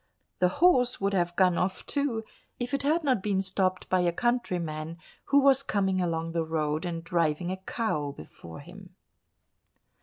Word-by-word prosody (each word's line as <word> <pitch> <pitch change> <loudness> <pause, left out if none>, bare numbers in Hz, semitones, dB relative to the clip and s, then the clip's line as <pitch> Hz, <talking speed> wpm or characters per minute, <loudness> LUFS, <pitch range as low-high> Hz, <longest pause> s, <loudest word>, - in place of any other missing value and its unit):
The 180 - +4 0.2
horse 250 -9 +4
would 195 0 0
have 175 -2 0
gone 180 -2 +3
off 185 +1 -2
too 280 -6 -1 0.4
if 245 +2 -4
it 275 - +1
had 310 +4 +1
not 260 -8 +2
been 195 -1 0
stopped 185 -1 -1
by 185 - +2
a 175 -1 +2
countryman, 170 -8 -2 0.3
who 280 0 +4
was 270 -1 +5
coming 195 -7 0
along 165 -1 -1
the 165 0 0
road 155 0 -1
and 165 -1 -4
driving 170 0 0
a 190 - -3
cow 190 -7 -2
before 80 - -11
him. - - -13
185 Hz, 170 wpm, -28 LUFS, 165-240 Hz, 0.4 s, was